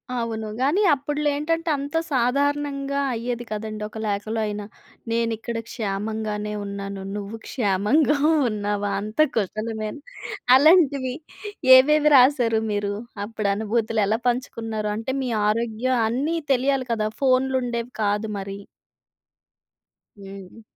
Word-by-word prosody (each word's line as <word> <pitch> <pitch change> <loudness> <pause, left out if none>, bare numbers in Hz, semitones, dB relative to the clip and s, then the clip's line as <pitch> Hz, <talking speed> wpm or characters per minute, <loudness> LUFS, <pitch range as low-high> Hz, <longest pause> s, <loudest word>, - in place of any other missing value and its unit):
అవును. 225 -2 -3
గానీ, 295 +10 +2
అప్పుడులో 295 +2 -1
ఏంటంటే, 330 +2 -1
అంతా 285 +4 -2
సాధారణంగా 280 +2 0
అయ్యేది 240 +1 -3
కదండి, 215 0 -4
ఒక 215 - -11
లేఖలో 210 +2 -2
అయినా. 210 0 -4 0.5
నేనిక్కడ 230 0 -1
క్షేమంగానే 210 0 -3
ఉన్నాను, 200 -1 -6
నువ్వు 205 +2 -5
క్షేమంగా 245 +7 +2 0.3
ఉన్నావా 205 -1 -2
అంత 215 +6 -8 0.2
కుశలమేన 215 +3 -3 0.6
అలాంటివి. 280 -4 +4 0.6
ఏవేవి 300 +3 +4
రాశారు 250 -4 +4
మీరు? 205 0 -1 0.3
అప్పుడనుభూతులు 215 +1 -1
ఎలా 220 +3 0
పంచుకున్నారు? 225 -3 -3
అంటే, 225 +4 -3
మీ 255 - -2 0.2
ఆరోగ్యం 235 +3 0
అన్నీ 280 +9 -1 0.2
తెలియాలి 265 0 0
కదా! 215 -2 0
ఫోన్లుండేవి 255 -2 +1
కాదు 205 +1 0
మరి. 195 0 -6 1.6
హ్మ్. 195 +1 -11
230 Hz, 105 wpm, -23 LUFS, 210-265 Hz, 1.6 s, అలాంటివి